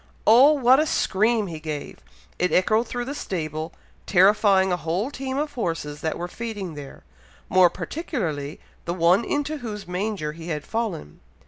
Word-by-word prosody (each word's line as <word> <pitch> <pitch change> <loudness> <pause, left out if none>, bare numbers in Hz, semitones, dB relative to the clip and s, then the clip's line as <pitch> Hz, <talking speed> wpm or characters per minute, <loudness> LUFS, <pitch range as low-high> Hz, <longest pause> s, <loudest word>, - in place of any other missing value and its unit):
Oh! 255 +7 +7
what 260 -2 +5
a 310 - +2
scream 220 -2 +1
he 165 -4 -6
gave! 155 -2 -6 0.4
it 180 - +1
echoed 215 +5 +2
through 245 +1 -4
the 275 - -4
stable, 155 - -4 0.4
terrifying 190 0 +4
a 180 - +1
whole 175 - -2
team 265 -1 -4
of 295 0 -2
horses 165 - -3
that 160 - -2
were 175 - -4
feeding 205 -3 -6
there, 145 - -10 0.5
more 185 -1 +6
particularly 170 - -4 0.3
the 170 - -2
one 180 +5 +4
into 290 +4 -2
whose 210 -6 -6
manger 180 -3 -2
he 165 +2 -10
had 150 -3 -3
fallen. 215 - -4
190 Hz, 160 wpm, -24 LUFS, 165-235 Hz, 0.5 s, Oh